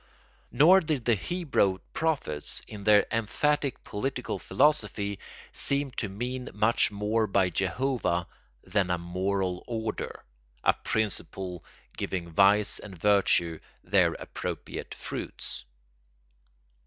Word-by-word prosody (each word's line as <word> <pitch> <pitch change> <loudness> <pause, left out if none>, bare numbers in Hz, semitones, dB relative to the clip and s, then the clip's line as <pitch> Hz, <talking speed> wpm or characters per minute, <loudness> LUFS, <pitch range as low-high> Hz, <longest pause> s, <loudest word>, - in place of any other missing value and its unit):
Nor 175 +7 +7
did 155 -8 -2
the 120 - +4
Hebrew 130 - +1 0.2
prophets, 145 - -1
in 105 -2 -8
their 105 -1 +6
emphatic 140 +5 0
political 125 +1 -3
philosophy, 105 -9 +1 0.3
seem 140 -1 -1
to 110 -3 -3
mean 125 +5 -4
much 105 +3 +3
more 105 +2 0
by 95 -2 +2
Jehovah 95 -2 0 0.4
than 100 -4 0
a 90 - +1
moral 90 +1 -1
order, 110 -2 -4 0.4
a - - +5
principle 95 -5 -2 0.3
giving 85 -3 -3
vice 100 +4 +4
and 95 -3 -10
virtue 85 -4 +3 0.2
their - - +3
appropriate - - -6
fruits. - - -6
105 Hz, 105 wpm, -28 LUFS, 95-125 Hz, 0.4 s, Nor